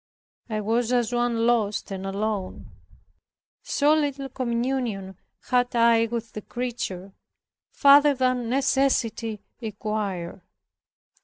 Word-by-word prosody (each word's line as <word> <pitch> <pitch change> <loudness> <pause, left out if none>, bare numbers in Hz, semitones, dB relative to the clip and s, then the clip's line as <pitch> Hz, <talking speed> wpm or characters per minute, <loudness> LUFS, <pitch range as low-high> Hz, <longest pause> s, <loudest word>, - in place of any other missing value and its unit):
I 215 -1 -2
was 230 +3 0
as 245 -1 +1
one 240 -1 +1
lost, 220 -4 +1
and 195 0 -4
alone; 200 -1 -3 0.9
so 295 +1 +2
little 285 -3 -1
communion 235 -6 -2 0.3
had 245 -1 +1
I 230 -1 +4
with 230 -1 -5
the 215 - -6
creature, 225 -6 -5 0.6
farther 285 0 +6
than 255 -2 0
necessity 245 -5 0 0.2
required. 205 -5 -4
235 Hz, 100 wpm, -25 LUFS, 210-255 Hz, 0.9 s, farther